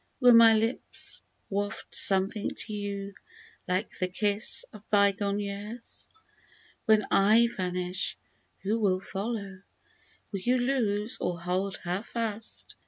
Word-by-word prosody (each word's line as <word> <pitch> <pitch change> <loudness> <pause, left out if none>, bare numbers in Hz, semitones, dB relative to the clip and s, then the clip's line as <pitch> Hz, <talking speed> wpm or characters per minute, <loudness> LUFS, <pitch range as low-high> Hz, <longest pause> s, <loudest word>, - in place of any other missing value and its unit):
Will 250 -2 +7
my 230 -1 +8
lips 225 +3 0 0.3
waft 205 +1 -4
something 195 +2 +2
to 215 - -5
you 200 -1 -4 0.5
like 185 +4 -2
the 185 - +1
kiss 205 +3 +3
of 215 - -11
bygone 200 0 +2
years? 205 +3 -6 0.8
When 215 -1 +4
/ - - -31
vanish, 190 -4 +2 0.5
who 215 +4 0
will 190 -4 +2
follow? 195 -1 -5 0.7
Will 200 - -3
you 245 +7 +2
loose 235 -4 0
or 175 -1 -2
hold 185 +3 -2
her 180 +2 -2
fast 225 -1 -4
205 Hz, 120 wpm, -28 LUFS, 195-225 Hz, 0.8 s, my